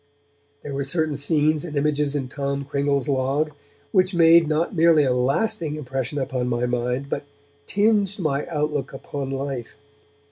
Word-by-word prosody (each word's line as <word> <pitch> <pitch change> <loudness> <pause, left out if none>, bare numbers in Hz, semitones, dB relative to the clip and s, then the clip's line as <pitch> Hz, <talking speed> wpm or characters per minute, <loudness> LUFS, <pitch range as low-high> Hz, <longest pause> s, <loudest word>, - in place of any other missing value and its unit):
There 140 - -6
were 140 0 -1
certain 155 +1 -1
scenes 150 +1 +1
and 160 -4 -6
images 145 0 0
in 135 -3 -2
Tom 140 +1 -3
Cringle's 140 0 0
Log 140 +3 0 0.4
which 185 -1 +2
made 165 -1 +6
not 155 +4 0
merely 165 -2 +5
a 130 -2 +2
lasting 150 - 0
impression 135 -1 -3
upon 130 -2 -2
my 120 0 0
mind, 125 +2 -1
but 140 - -3 0.4
tinged 205 -1 +2
my 150 -6 -1
outlook 150 -4 -2
upon 135 0 -5
life. 135 -3 -4
145 Hz, 150 wpm, -23 LUFS, 135-155 Hz, 0.4 s, made